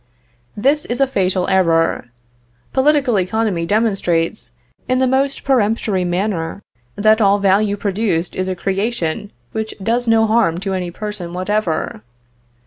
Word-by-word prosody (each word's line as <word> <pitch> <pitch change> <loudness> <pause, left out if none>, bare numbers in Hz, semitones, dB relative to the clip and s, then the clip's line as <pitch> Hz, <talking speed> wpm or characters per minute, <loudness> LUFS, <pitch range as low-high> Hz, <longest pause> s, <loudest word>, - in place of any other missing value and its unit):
This 280 +7 +2
is 240 - -3
a 275 - +5
fatal 185 -7 0
error; 165 -7 +2 0.7
political 270 -5 +3
economy 185 -3 -1
demonstrates, 180 - 0 0.4
in 255 - +2
the 260 - +3
most 270 +2 0
peremptory 220 -6 +1
manner, 180 0 -2 0.3
that 215 +2 +3
all 200 -1 +4
value 200 +1 +2
produced 195 -4 -1
is 185 0 -2
a 185 - -2
creation 195 -1 -2 0.2
which 220 0 -4
does 230 +4 -1
no 225 0 +4
harm 215 -7 +2
to 195 -1 -2
any 180 -2 -2
person 180 -2 -6
whatever. 185 - -2
205 Hz, 135 wpm, -18 LUFS, 180-225 Hz, 0.7 s, a